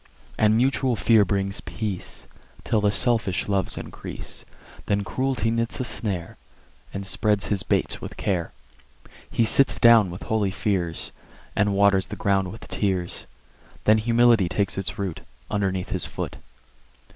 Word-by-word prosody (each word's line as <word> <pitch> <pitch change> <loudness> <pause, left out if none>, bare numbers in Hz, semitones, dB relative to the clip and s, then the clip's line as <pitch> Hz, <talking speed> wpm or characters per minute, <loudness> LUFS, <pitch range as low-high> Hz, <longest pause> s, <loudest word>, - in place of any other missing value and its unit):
And 110 0 +3
mutual 130 0 +2
fear 110 +2 +5
brings 100 -1 -1
peace, 105 -5 -5 0.4
Till 110 - +1
the 105 - +3
selfish 110 -4 +2
loves 100 -2 0
increase: - - -7 0.4
Then 100 0 +1
Cruelty 130 0 -1
knits 115 0 -1
a - - 0
snare, 100 -8 -4 0.5
And 100 0 -5
spreads 105 +1 0
his 100 -2 +1
baits - - -1
with - - -8
care. 90 -4 -1 0.8
He 115 - +2
sits 135 +5 +4
down 115 -5 +7
with 90 +2 -8
holy 110 -3 0
fears, 95 -4 -2 0.4
And 105 -1 +2
waters 100 -1 +4
the - - -6
grounds 95 -1 +1
with 110 +5 -10
tears; 95 -4 -1 0.6
Then 110 +1 +5
Humility 115 -4 +4
takes 100 0 0
its 95 -1 -3
root 95 -5 -3 0.3
Underneath 95 -3 -1
his - - -1
foot. - - -5
100 Hz, 145 wpm, -24 LUFS, 95-115 Hz, 0.8 s, down